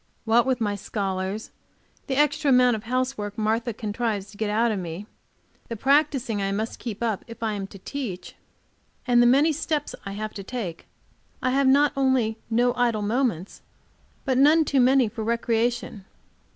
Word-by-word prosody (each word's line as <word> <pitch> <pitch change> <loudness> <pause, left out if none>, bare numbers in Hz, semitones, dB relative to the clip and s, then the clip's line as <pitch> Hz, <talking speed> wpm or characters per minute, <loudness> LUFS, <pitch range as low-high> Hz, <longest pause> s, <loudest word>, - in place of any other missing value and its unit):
What 235 +2 +3
with 260 -2 +1
my 210 -3 0
scholars, 195 0 -4 0.6
the 270 - -1
extra 295 0 +2
amount 250 -2 +5
of 220 +1 -8
housework 250 -4 -2
Martha 225 +2 0
contrives 215 -1 -3
to - - -16
get 215 -1 -1
out 225 +2 +2
of 205 - -2
me, 175 +2 -6 0.6
the 230 - -5
practicing 270 -3 +1
I 195 0 -1
must 215 +3 -3
keep 230 -2 -5
up 220 -4 -1
if 230 0 -9
I 220 -1 0
am 195 -2 -4
to 195 - -12
teach, 205 -3 -6 0.7
and 245 -1 +4
the 240 - +5
many 285 +6 +4
steps 300 0 -2
I 195 - -6
have 215 +1 -5
to 200 - -7
take, 195 -7 -6 0.5
I 255 - 0
have 275 +1 +2
not 285 +2 +5
only 260 -5 +1
no 240 +2 +2
idle 240 -4 0
moments, 210 -5 -1 0.6
but 260 -2 +1
none 310 +3 +5
too 275 -1 +1
many 255 -1 +4
for 220 +1 -5
recreation. 230 -2 -1
230 Hz, 175 wpm, -25 LUFS, 210-260 Hz, 0.7 s, amount